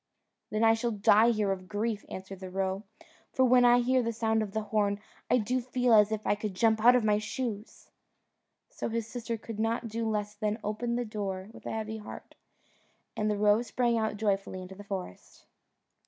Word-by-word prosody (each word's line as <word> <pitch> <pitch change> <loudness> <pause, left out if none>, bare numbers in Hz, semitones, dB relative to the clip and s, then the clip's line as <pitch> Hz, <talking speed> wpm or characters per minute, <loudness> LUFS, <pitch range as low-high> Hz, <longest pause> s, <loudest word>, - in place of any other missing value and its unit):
"Then 215 +1 0
I 225 0 +6
shall 225 +1 -1
die 215 +1 +4
here 210 -4 +1
of 185 -1 -4
grief," 210 +1 -2
answered 190 0 -8
the 190 -1 -7
roe: 190 +1 -2 0.5
"for 260 -2 +3
when 250 0 +5
I 245 0 +6
hear 255 +1 +2
the 230 -1 -1
sound 220 0 0
of 210 -2 -3
the 220 +1 -2
horn, 205 -1 0 0.3
I - - +5
do 250 +3 0
feel 250 -1 +1
as 210 -1 +6
if 215 -1 -3
I - - +3
could 205 -2 -4
jump 220 +1 +2
out 245 +1 +8
of 250 - +2
my 210 -1 +3
shoes." 215 0 -5 0.8
So - - -4
his 230 -1 -2
sister 230 0 -4
could 220 0 -8
not 230 +1 -1
do 225 +1 -2
less 210 -1 -2
than 210 0 -2
open 235 +3 -2
the 245 0 -1
door 200 -3 -4
with - - -11
a - - -3
heavy 220 0 -4
heart, 210 - -10 0.8
and 215 0 0
the 210 - 0
roe 210 +2 +4
sprang 240 0 0
out 220 -2 -1
joyfully 195 -3 -1
into 185 +1 -10
the 205 +2 -11
forest. 190 - -7
215 Hz, 205 wpm, -29 LUFS, 205-230 Hz, 0.8 s, out